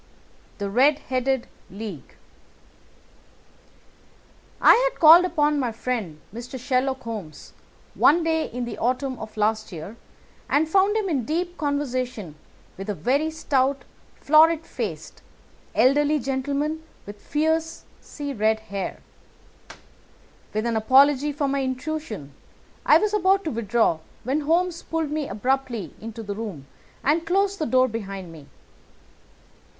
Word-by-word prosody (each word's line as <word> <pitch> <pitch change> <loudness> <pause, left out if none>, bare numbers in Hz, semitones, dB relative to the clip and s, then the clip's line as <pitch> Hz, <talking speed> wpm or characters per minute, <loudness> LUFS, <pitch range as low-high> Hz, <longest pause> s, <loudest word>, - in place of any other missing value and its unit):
THE 200 - -3
RED 265 +8 +4
HEADED 260 0 0 0.2
LEAGUE 195 - -8 2.4
I - - +8 0.2
had - - -19
called 335 +3 +9
upon 300 -4 +1
my 250 -4 -1
friend, 220 -9 -4
Mr. 245 +3 -7
Sherlock 260 +1 -1
Holmes, 210 -10 -8 0.4
one 335 +3 +4
day 320 -1 0
in 245 0 -3
the 235 - -7
autumn 255 +1 -1
of 220 0 -9
last 215 0 0
year 180 +6 -8 0.5
and 305 +2 +2
found 390 +5 +3
him 425 -3 -1
in 285 -8 0
deep 345 +7 -2
conversation 255 - -2 0.5
with 195 +2 -6
a 205 - -1
very 280 +10 +1
stout, 275 -3 0 0.3
florid 320 +2 +4
faced, - - -6 0.5
elderly 290 +3 +4
gentleman 280 +4 -2 0.2
with 205 0 -10
fiery 315 -2 -3
red 220 -1 +1
hair. 200 -3 -5 1.5
With 215 +2 -2
an 230 -1 0
apology 275 +5 +4
for 285 0 -1
my 275 0 0
intrusion, 260 - -4 0.5
I - - +8
was 425 0 0
about 390 -1 +3
to 315 - -2
withdraw 225 -6 +1 0.2
when 265 +5 0
Holmes 340 +3 0
pulled 325 -2 -3
me 300 -2 -2
abruptly 235 - -2
into 225 +1 -7
the 205 -1 -4
room 200 -10 -6 0.4
and 310 +4 +2
closed 390 +3 +1
the 310 - -1
door 255 0 +4
behind 195 -6 -6
me. 155 -4 -13
265 Hz, 130 wpm, -24 LUFS, 220-310 Hz, 2.4 s, called